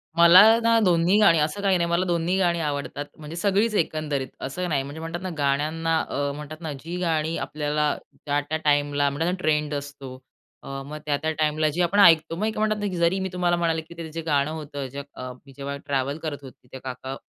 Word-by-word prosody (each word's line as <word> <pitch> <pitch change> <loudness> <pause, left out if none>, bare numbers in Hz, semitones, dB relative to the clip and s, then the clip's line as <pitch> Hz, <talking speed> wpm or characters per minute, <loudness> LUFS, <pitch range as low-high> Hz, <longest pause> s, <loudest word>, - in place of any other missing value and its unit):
मला 170 +3 +9 0.2
ना 230 0 +4
2न्ही 175 +2 +3
गाणी, 170 -6 +6
असं 155 +6 -1
काही 195 -2 +3
नाही, 170 0 0
मला 175 +2 +1
2न्ही 175 +1 0
गाणी 175 -2 +2
आवडतात, 145 -1 -3
म्हणजे 155 +1 -8
सगळीच 200 +5 +1
एकंदरीत. 155 -6 -1
असं 180 +7 -3
नाही. 140 -3 0
म्हणजे 145 +3 -8
म्हणतात 165 +2 -5
ना, 185 - -4
गाण्यांना 155 +3 0
अ, 140 0 -1
म्हणतात 150 +2 -9
ना, 160 -2 -4
जी 160 +6 -7
गाणी 165 -2 0
आपल्याला 150 0 -1 0.3
त्या-त्या 145 +1 -1
टाईमला, 145 -1 +2
म्हणतात 160 +5 -1
ना - - -1
ट्रेंड 150 -2 0
असतो. 140 -2 -6 0.5
अ, - - -11 0.2
मग 150 +2 -7
त्या-त्या 150 +1 0
टाईमला 155 0 +2
जी 165 +4 -2
आपण 175 +4 +2
ऐकतो. 165 -4 +6
मग 215 +5 -2
म्हणतात 215 0 +1
ना, 205 - -2
की - - -4
जरी 170 +3 +2
मी 190 0 -2
तुम्हाला 175 -1 +1
म्हणाले 165 -1 0
की 160 +2 -14
ते 165 -1 -6
जे 165 - -4
गाणं 145 -2 +1
होतं 145 -3 -6
ज - - -8 0.2
अ, 130 0 -6 0.2
जेव्हा 140 +1 -5
ट्रॅव्हल 140 0 -1
करत 150 -2 -3
होते, 130 -2 -14
ते - - -5
काका 130 +1 -6
155 Hz, 210 wpm, -24 LUFS, 145-170 Hz, 0.5 s, मला